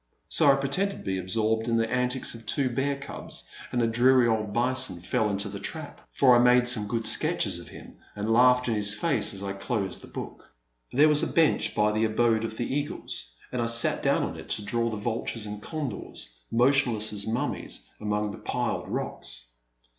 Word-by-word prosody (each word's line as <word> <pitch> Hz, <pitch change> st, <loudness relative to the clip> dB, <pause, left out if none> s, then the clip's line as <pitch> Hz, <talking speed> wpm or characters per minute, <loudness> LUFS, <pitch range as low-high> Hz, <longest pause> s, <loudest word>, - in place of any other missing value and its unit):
So 145 Hz, -3 st, +5 dB
I -, -, +4 dB
pretended 160 Hz, +9 st, 0 dB
to -, -, -11 dB
be 95 Hz, -1 st, -2 dB
absorbed 110 Hz, +4 st, 0 dB
in 115 Hz, -1 st, +1 dB
the 115 Hz, 0 st, +1 dB
antics 125 Hz, +2 st, 0 dB
of 115 Hz, -2 st, -11 dB
two 135 Hz, 0 st, 0 dB
bear 140 Hz, +3 st, 0 dB
cubs, 140 Hz, 0 st, -7 dB, 0.2 s
and 125 Hz, -, -1 dB
the 120 Hz, -, +3 dB
dreary 120 Hz, +2 st, +4 dB
old 110 Hz, -2 st, 0 dB
bison 120 Hz, -5 st, 0 dB
fell 110 Hz, +5 st, 0 dB
into 100 Hz, 0 st, -1 dB
the 100 Hz, 0 st, -6 dB
trap, 155 Hz, +8 st, -6 dB
for 130 Hz, -3 st, +5 dB
I -, -, +5 dB
made 125 Hz, 0 st, +5 dB
some 110 Hz, -4 st, +4 dB
good 115 Hz, +1 st, -2 dB
sketches -, -, +1 dB
of -, -, -11 dB
him -, -, -13 dB, 0.2 s
and 105 Hz, +2 st, -1 dB
laughed 125 Hz, +1 st, +4 dB
in 115 Hz, -, +1 dB
his 105 Hz, -1 st, +4 dB
face 115 Hz, -4 st, +2 dB
as 100 Hz, -1 st, -4 dB
I 100 Hz, 0 st, -3 dB
closed 100 Hz, -1 st, -3 dB
the -, -, -12 dB
book. -, -, -9 dB, 0.4 s
There 145 Hz, +5 st, +5 dB
was 150 Hz, -1 st, +4 dB
a -, -, 0 dB
bench 165 Hz, -2 st, +2 dB
by 105 Hz, 0 st, +2 dB
the 110 Hz, +1 st, +1 dB
abode 110 Hz, 0 st, +1 dB
of 110 Hz, -1 st, -5 dB
the 120 Hz, -, -2 dB
eagles, 145 Hz, -, -4 dB, 0.2 s
and 125 Hz, -, -2 dB
I 115 Hz, -, 0 dB
sat 115 Hz, 0 st, +1 dB
down -, -, +2 dB
on -, -, -4 dB
it -, -, -11 dB
to 105 Hz, -, 0 dB
draw 115 Hz, +2 st, 0 dB
the 110 Hz, -, -4 dB
vultures 115 Hz, 0 st, -3 dB
and 105 Hz, 0 st, -6 dB
condors, 130 Hz, -, -6 dB, 0.2 s
motionless 120 Hz, -3 st, +3 dB
as 100 Hz, 0 st, 0 dB
mummies 115 Hz, +3 st, -2 dB
among 105 Hz, 0 st, -1 dB
the -, -, -9 dB
piled -, -, -3 dB
rocks. -, -, -5 dB
115 Hz, 205 wpm, -27 LUFS, 105-125 Hz, 0.4 s, So